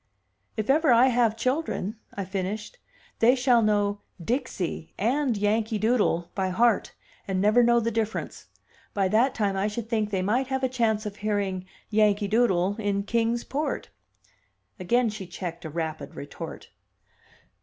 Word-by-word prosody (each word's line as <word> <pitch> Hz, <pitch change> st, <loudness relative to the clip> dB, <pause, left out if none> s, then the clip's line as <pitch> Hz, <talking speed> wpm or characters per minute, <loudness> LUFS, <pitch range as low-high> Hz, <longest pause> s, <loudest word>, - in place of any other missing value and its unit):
"If 215 Hz, -1 st, -2 dB
ever 300 Hz, +1 st, +4 dB
I 240 Hz, +2 st, +6 dB
have 235 Hz, -3 st, +2 dB
children," 255 Hz, -, -1 dB, 0.2 s
I 200 Hz, -, -3 dB
finished, 200 Hz, -, -4 dB, 0.4 s
"they 240 Hz, +3 st, +5 dB
shall 250 Hz, -2 st, +4 dB
know 205 Hz, -1 st, +1 dB, 0.2 s
'Dixie' 200 Hz, -, -3 dB
and 250 Hz, +2 st, +1 dB
'Yankee 215 Hz, +2 st, +1 dB
Doodle' 210 Hz, -6 st, +1 dB
by 190 Hz, -1 st, -1 dB
heart, 230 Hz, +6 st, +2 dB, 0.3 s
and 190 Hz, -1 st, -1 dB
never 210 Hz, +5 st, +5 dB
know 235 Hz, 0 st, +5 dB
the 230 Hz, 0 st, -1 dB
difference. 220 Hz, 0 st, -3 dB, 0.5 s
By 195 Hz, -2 st, +2 dB
that 235 Hz, +6 st, +3 dB
time 200 Hz, -3 st, 0 dB
I 195 Hz, +2 st, +1 dB
should 225 Hz, +1 st, -5 dB
think 215 Hz, -3 st, 0 dB
they 190 Hz, -3 st, -1 dB
might 245 Hz, +7 st, +1 dB
have 265 Hz, 0 st, -2 dB
a -, -, +4 dB
chance 225 Hz, -4 st, 0 dB
of 205 Hz, -1 st, -5 dB
hearing 200 Hz, -3 st, -2 dB, 0.2 s
'Yankee 210 Hz, -1 st, +3 dB
Doodle' 205 Hz, -3 st, +2 dB
in 200 Hz, -2 st, 0 dB
Kings 230 Hz, +2 st, 0 dB
Port." 295 Hz, +3 st, -3 dB, 0.9 s
Again 240 Hz, +7 st, +2 dB
she 205 Hz, -3 st, -7 dB
checked 175 Hz, -1 st, -6 dB
a -, -, -4 dB
rapid 160 Hz, 0 st, -4 dB
retort. 160 Hz, +3 st, -8 dB
215 Hz, 155 wpm, -26 LUFS, 195-240 Hz, 0.9 s, I